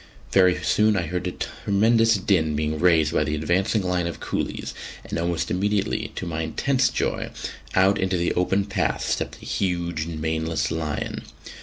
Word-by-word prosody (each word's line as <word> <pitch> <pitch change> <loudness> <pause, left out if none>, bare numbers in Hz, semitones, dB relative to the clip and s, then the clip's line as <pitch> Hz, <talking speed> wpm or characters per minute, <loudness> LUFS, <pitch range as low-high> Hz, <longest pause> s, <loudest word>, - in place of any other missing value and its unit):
Very 90 -2 +4
soon 105 0 +3
I 90 - +1
heard 90 +3 -3
a - - -1
tremendous 115 +3 +2
din 90 -6 +1
being 75 +1 -1
raised 80 -3 +4
by - - +3
the 75 +1 -1
advancing 90 +7 +1
line 90 -1 0
of 85 - -5
coolies, - - -3 0.3
and - - -3
almost 85 0 -1
immediately, 100 +2 0
to - - -4
my 80 -1 -3
intense 125 - +1
joy, - - -2 0.5
out 95 +2 +4
into 95 -1 +1
the 85 0 0
open 95 +2 +1
path 100 - -1
stepped - - -1
a - - -9
huge 85 -4 -1
maneless 80 -1 -1
lion. 80 -2 -3
90 Hz, 165 wpm, -24 LUFS, 80-95 Hz, 0.5 s, Very